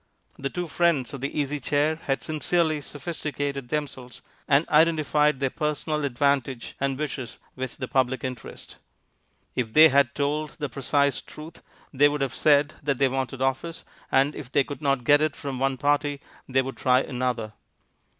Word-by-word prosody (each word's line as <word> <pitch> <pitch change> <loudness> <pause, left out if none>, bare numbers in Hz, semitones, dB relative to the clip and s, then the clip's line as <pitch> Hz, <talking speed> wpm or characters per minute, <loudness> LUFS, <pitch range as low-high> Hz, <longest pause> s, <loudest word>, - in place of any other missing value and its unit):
The 140 - -2
two 175 +2 -4
friends 160 -6 +1
of 135 - -6
the 140 +2 -3
Easy 145 0 -1
Chair 145 +4 +1
had 135 -4 -2
sincerely 155 0 0
sophisticated 145 -3 -4
themselves, 130 -5 -5 0.3
and 145 +3 +3
identified 150 -2 +3
their 135 -2 0
personal 150 -1 -2
advantage 135 -1 0
and 135 -1 -1
wishes 135 -5 -5 0.2
with 130 -1 -5
the 130 - -4
public 130 0 0
interest. 125 -3 -7 0.8
If 115 -3 -2
they 160 +1 +9
had 140 -2 +3
told 150 +1 -1
the 145 - -3
precise 140 +1 +1
truth 155 +2 -12 0.3
they 145 +2 +5
would 145 -1 -3
have 135 -3 -1
said 145 -1 +3
that 140 -3 0
they 135 0 +3
wanted 130 0 -2
office, 135 +5 -2 0.3
and 135 +3 +3
if 130 -4 -9
they 140 - +3
could 140 -1 -8
not 140 -3 +1
get 145 +4 +5
it 155 -1 0
from 135 -3 -5
one 135 0 0
party 145 +1 +1 0.3
they 130 0 +2
would 135 +1 -6
try 130 0 +3
another. 125 -5 -3
140 Hz, 170 wpm, -25 LUFS, 130-150 Hz, 0.8 s, they